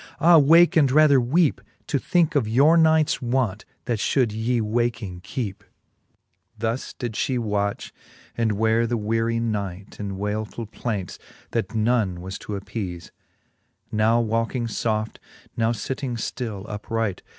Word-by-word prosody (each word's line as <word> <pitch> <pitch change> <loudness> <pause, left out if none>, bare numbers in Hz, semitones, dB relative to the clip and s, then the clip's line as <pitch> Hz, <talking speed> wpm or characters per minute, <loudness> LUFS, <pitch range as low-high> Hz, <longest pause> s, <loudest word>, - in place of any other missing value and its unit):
Ah 165 +1 +7
wake, 165 +6 +6
and 145 -5 +4
rather 145 -2 +5
weepe, 150 +6 +2 0.2
To 140 - 0
thinke 170 +3 +1
of 140 -7 +1
your 140 +9 +5
nights 160 -2 +3
want, 120 -5 -1 0.2
that 120 -4 -1
fhould 120 0 +1
yee 115 +3 0
waking 110 -4 -2
kecpe. 100 0 -4
XXVI. - - -28 0.9
Thus 115 +3 -3
did 120 -3 -4
fhe 130 +4 -1
watch, 105 -3 -2 0.4
and 115 -2 +1
weare 110 +2 +2
the 120 0 -1
weary 115 +2 0
night 100 -4 -4
In 100 -2 -4
waylfull 105 +2 -4
plaints, 105 -8 -4 0.3
that 115 0 -2
none 110 -5 +1
was 95 +2 -7
to 105 - -7
appeafe; 95 -4 -6 0.8
Now 110 +2 +3
walking 115 +2 -1
foft, 110 -1 -2 0.4
now 115 0 +1
fitting 125 +2 -4
ftill 110 -3 -4
upright. 105 -1 -3
115 Hz, 140 wpm, -24 LUFS, 105-125 Hz, 0.9 s, Ah